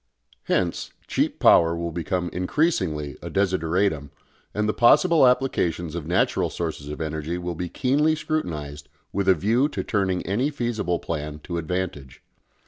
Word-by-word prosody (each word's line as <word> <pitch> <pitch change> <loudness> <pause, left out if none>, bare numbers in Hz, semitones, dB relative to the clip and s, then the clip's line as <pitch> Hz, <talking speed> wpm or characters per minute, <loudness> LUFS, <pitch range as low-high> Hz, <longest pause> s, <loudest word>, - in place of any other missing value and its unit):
Hence 90 -2 -1 0.2
cheap - - 0
power 85 0 +5
will 85 0 -3
become 85 +2 -2
increasingly 90 - 0
a - - -6
desideratum, 90 -5 0 0.4
and 105 0 -1
the 105 - +1
possible 155 +4 +5
applications 90 - 0
of 85 -3 -5
natural 90 +2 +1
sources 80 -4 -4
of 75 - -6
energy 80 +1 -3
will 90 0 -4
be 90 +1 -4
keenly 145 - +2
scrutinised 75 - -4 0.2
with 100 0 +1
a 95 - +6
view 115 - +2
to - - -4
turning 95 -4 -1
any 115 +9 0
feasible 115 - -1
plan 75 -2 -5
to 85 -1 -3
advantage. 85 -6 -4
90 Hz, 145 wpm, -24 LUFS, 80-105 Hz, 0.4 s, a